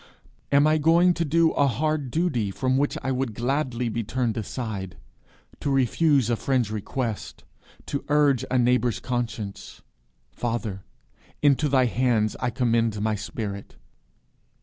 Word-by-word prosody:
Am 140 +1 +5
I 155 0 +3
going 170 +4 +4
to 170 - -1
do 165 +1 +3
a 140 - +2
hard 150 +1 -1
duty, 145 - 0
from 130 +6 0
which 145 +2 0
I 135 - -1
would 130 -4 -2
gladly 125 0 -1
be 115 0 -2
turned 120 0 -1
aside, 110 -4 -5 0.6
to - - -2
refuse 135 0 +2
a 120 - +1
friend's 120 -1 0
request, 110 +1 -4 0.4
to 140 - -3
urge 145 -4 +3
a 130 - +1
neighbour's 125 -1 +2
conscience? 115 -5 -5 0.5
Father, 115 -5 -3 0.6
into 145 +1 +3
thy 130 -2 +4
hands 120 -3 +1
I 125 - 0
commend 115 -3 +1
my 110 +1 0
spirit. 105 -1 -5
125 Hz, 140 wpm, -25 LUFS, 115-140 Hz, 0.6 s, Am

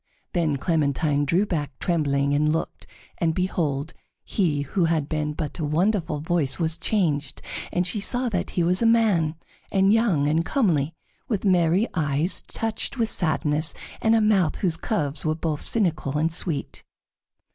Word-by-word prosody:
Then 160 -5 +1
Clementine 145 -1 +1
drew 175 +8 +2
back 150 -8 -3
trembling 140 -5 0
and 150 +1 +2
looked, 160 - -3 0.3
and 165 -2 +1
behold, 160 -5 -1 0.3
he 160 -8 0
who 170 +5 0
had 160 -3 0
been 150 -1 -2
but 150 +1 -5
a - - -2
wonderful 165 +1 0
voice 160 -4 0
was 165 -1 +1
changed, 150 -11 0 0.3
and 180 0 0
she 210 +4 -2
saw 245 +5 0
that 185 -5 -2
he 175 - +3
was 180 +4 +2
a 230 - +4
man, 205 -9 +3 0.4
and 195 +1 +4
young, 200 -11 +2
and 160 +2 +2
comely, 165 - +1 0.3
with 210 -3 -2
merry 180 +2 +3
eyes 155 +1 +1
touched 225 +4 -3
with 225 -3 0
sadness, 155 -2 0 0.3
and 225 0 +4
a 225 - +3
mouth 195 -7 +3
whose 175 -5 0
curves 155 - -2
were 155 0 0
both 160 -2 -2
cynical 165 - 0
and 160 +2 +1
sweet. 165 -3 -2
165 Hz, 160 wpm, -24 LUFS, 150-190 Hz, 0.4 s, a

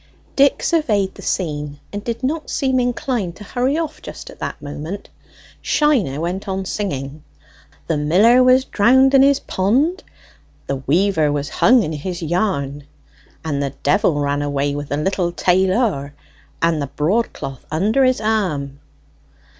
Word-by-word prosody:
Dick 280 0 +3
surveyed 215 - +1
the - - -12
scene, 150 -5 -3
and 205 0 -4
did 235 +2 -4
not 305 +4 -2
seem 260 -2 +1
inclined 245 - -1
to 210 - -11
hurry 255 +7 -1
off 320 -2 -4
just - - -9
at - - -16
that - - -5
moment. 155 +7 -7 0.5
Shiner 245 - +1
went 180 +5 -3
on 190 0 -3
singing 150 -8 -4 0.6
"'The 160 - -1
miller 200 +12 +4
was 255 +1 +4
drown'd 260 +6 +4
in 270 - +7
his 280 0 +4
pond, 265 - 0 0.6
The 140 - -2
weaver 155 +3 +1
was 145 -1 -2
hung 245 -1 +4
in 155 - -3
his 170 +3 -5
yarn, 150 -5 -1 0.6
And 145 -3 -1
the 140 -1 -3
d - - +4
ran 145 -3 +1
away 145 0 -1
with 145 0 -5
the 145 - -1
little 175 +2 0
tail 185 +2 +2
or, 145 - -1 0.5
With 165 -2 +2
the 140 - -2
broadcloth 150 - -1
under 210 - +2
his 255 -1 +3
arm.'" 175 -11 -1
190 Hz, 155 wpm, -19 LUFS, 145-245 Hz, 0.6 s, in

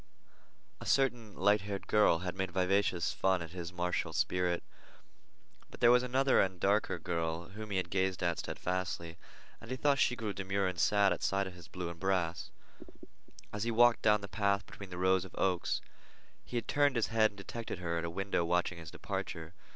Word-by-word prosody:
A - - -9
certain 120 -6 +1
light 105 +2 +3
haired 100 -1 -5
girl 105 -6 +4
had 90 - -3
made 95 -1 -2
vivacious 95 -1 +1
fun 95 -2 +1
at 85 - -10
his 90 -1 -6
martial 90 0 -2
spirit, 90 -1 0 1.1
but - - -12
there 120 - +6
was 125 0 +6
another 130 +2 +3
and 95 -2 -1
darker 100 +4 +2
girl 85 -1 -3
whom 105 +2 -8
he 100 - -1
had 90 - -2
gazed 95 -1 0
at 85 -1 0
steadfastly, 90 -2 -3 0.4
and 115 - -11
he 130 - -3
thought 140 0 +2
she 125 - +3
grew 110 -4 -3
demure 95 +1 -1
and 90 -2 -3
sad 100 0 +4
at - - -7
sight 100 0 +1
of 95 - -7
his 90 -2 -13
blue 90 -2 -5
and 85 - -11
brass. 90 -3 -1 1.0
As 105 - -4
he 120 - 0
had 115 - -3
walked 120 0 +6
down 105 -1 +4
the 100 - -6
path 100 -1 0
between 100 -2 -10
the 90 - -7
rows 95 0 +3
of 95 - -11
oaks, 90 -2 0 0.6
he 120 - -5
had 115 - -3
turned 145 -2 +3
his 115 - +1
head 110 -1 +5
and 100 - -20
detected 110 +2 -6
her 85 -1 -2
at - - -4
a 85 - -2
window 95 0 -1
watching 90 0 0
his 85 -2 -9
departure. 80 0 -5
95 Hz, 205 wpm, -33 LUFS, 90-105 Hz, 1.1 s, there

